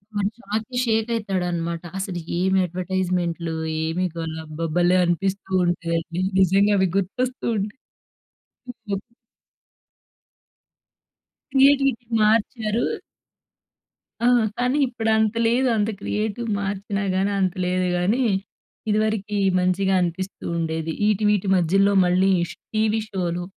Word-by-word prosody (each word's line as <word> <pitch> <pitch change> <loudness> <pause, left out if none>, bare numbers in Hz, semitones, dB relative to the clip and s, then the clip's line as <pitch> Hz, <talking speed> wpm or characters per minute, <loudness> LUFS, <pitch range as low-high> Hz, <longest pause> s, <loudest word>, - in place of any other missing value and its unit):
వాడు 205 0 +1
షాక్‌కి 220 +4 -4
షేక్ 225 0 +1
అయితాడన్నమాట. 175 -5 -2
అసలు 190 -2 -3 0.2
ఏమి 190 +2 +2
అడ్వర్టైజ్మెంట్‌లు, 180 -2 -2 0.3
ఏమి 165 +3 -1
గల. 165 -1 -4
అబ్బా! 155 +2 -5
భలే 175 +1 +4
అనిపిస్తూ 190 +3 -1
ఉంటదండి. 170 0 -2 0.2
నిజంగా 195 +2 +4
అవి 190 - +3
గుర్తొస్తూ 250 +7 -2
ఉంటాయి. 205 +4 -3 1.1
హ్మ్. 195 -1 -1 2.5
క్రియేటివిటీ 275 -2 +4
మార్చారు 220 +1 +1 1.4
ఆ! - - +5 0.3
కానీ 250 +3 +1
ఇప్పుడు 235 -2 -2
అంత 220 0 +1
లేదు. 250 +3 +2
అంత 210 +1 +1
క్రియేటివ్ 220 +3 -2
మార్చినా 200 0 -3
కానీ 195 +2 +1
అంత 185 -2 +1
లేదు 185 0 0
కానీ, 195 +8 +1 0.7
ఇదివరకి 215 -1 0 0.2
మంచిగా 185 +1 +1
అనిపిస్తూ 180 +3 -4
ఉండేది. 160 -1 -2 0.2
ఈటీ 210 0 +1
వీటి 205 -1 +1
మధ్యలో 195 +4 +3
మళ్ళీ 185 +2 +3 0.2
ష్ - - -11 0.2
టీవీ 220 0 +2
షోలు 180 -3 -2
195 Hz, 110 wpm, -23 LUFS, 180-215 Hz, 2.5 s, ఆ